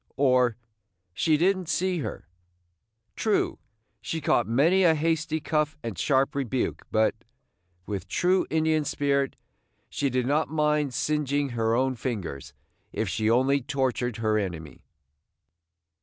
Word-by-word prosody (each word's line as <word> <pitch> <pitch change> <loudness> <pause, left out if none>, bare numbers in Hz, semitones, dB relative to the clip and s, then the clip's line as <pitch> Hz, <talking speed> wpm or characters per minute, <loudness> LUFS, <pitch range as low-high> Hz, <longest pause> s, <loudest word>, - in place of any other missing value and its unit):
or, 125 -4 +3 0.6
"She 150 - +2
did 185 +5 +3
n't 185 -3 -7
see 180 +2 0
her." 145 - -6 0.9
True, 215 -2 0 0.4
she 160 - -3
caught 130 -5 +1
many 155 +11 +3
a 165 -3 +5
hasty 160 0 0
cuff 150 0 -1
and 115 -4 -4
sharp 135 - +1
rebuke; 130 -3 -2
but, 110 0 +2 0.7
with 100 -2 -5
true 180 - +1
Indian 160 -1 +1
spirit, 140 -1 0 0.5
she 140 - -1
did 125 -1 0
not 145 +3 +1
mind 150 -3 +1
singeing 145 -1 0
her 115 -2 0
own 130 +1 +1
fingers 105 - -5 0.4
if - - -2
she 110 0 0
only 130 +4 +3
tortured 130 -3 -1
her 110 -1 +1
enemy. 85 -6 -6
140 Hz, 130 wpm, -26 LUFS, 120-155 Hz, 0.9 s, a